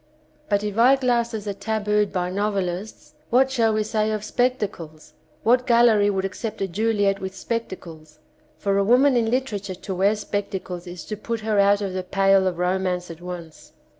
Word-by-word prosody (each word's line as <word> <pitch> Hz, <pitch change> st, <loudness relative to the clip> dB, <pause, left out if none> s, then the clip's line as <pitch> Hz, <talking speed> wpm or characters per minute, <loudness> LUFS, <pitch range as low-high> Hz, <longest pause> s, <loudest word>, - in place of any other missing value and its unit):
But 205 Hz, -1 st, +1 dB
if 210 Hz, +1 st, -3 dB
eyeglasses 240 Hz, -4 st, +2 dB
are 200 Hz, -, -1 dB
tabooed 210 Hz, 0 st, 0 dB
by 180 Hz, -2 st, -2 dB
nov 205 Hz, +2 st, -1 dB
elists, 185 Hz, +2 st, -4 dB, 0.2 s
what 265 Hz, +2 st, +3 dB
shall 230 Hz, -4 st, +2 dB
we 215 Hz, 0 st, +1 dB
say 215 Hz, 0 st, 0 dB
of 215 Hz, -1 st, -3 dB
spectacles? 210 Hz, -10 st, -2 dB, 0.3 s
What 250 Hz, +3 st, +3 dB
gallery 235 Hz, -4 st, +5 dB
would 195 Hz, -1 st, -1 dB
accept 215 Hz, +3 st, -5 dB
a 195 Hz, -, -1 dB
Juhet 205 Hz, +1 st, +1 dB
with 190 Hz, 0 st, -6 dB
spectacles? 175 Hz, -8 st, -6 dB, 0.4 s
For 200 Hz, -1 st, 0 dB
a -, -, +3 dB
woman 255 Hz, +6 st, +4 dB
in 230 Hz, -2 st, +2 dB
literature 210 Hz, -7 st, -2 dB
to 190 Hz, +2 st, -6 dB
wear 195 Hz, +3 st, +2 dB
spectacles 190 Hz, -3 st, -4 dB
is 175 Hz, -2 st, -8 dB
to 215 Hz, -, -4 dB
put 225 Hz, +2 st, -4 dB
her 215 Hz, -1 st, +1 dB
out 200 Hz, +1 st, +4 dB
of 195 Hz, -2 st, -3 dB
the 185 Hz, -, -2 dB
pale 195 Hz, +1 st, +3 dB
of 180 Hz, -2 st, -2 dB
romance 180 Hz, -1 st, -1 dB
at 165 Hz, +1 st, -11 dB
once. 175 Hz, -3 st, -9 dB
205 Hz, 180 wpm, -23 LUFS, 190-225 Hz, 0.4 s, gallery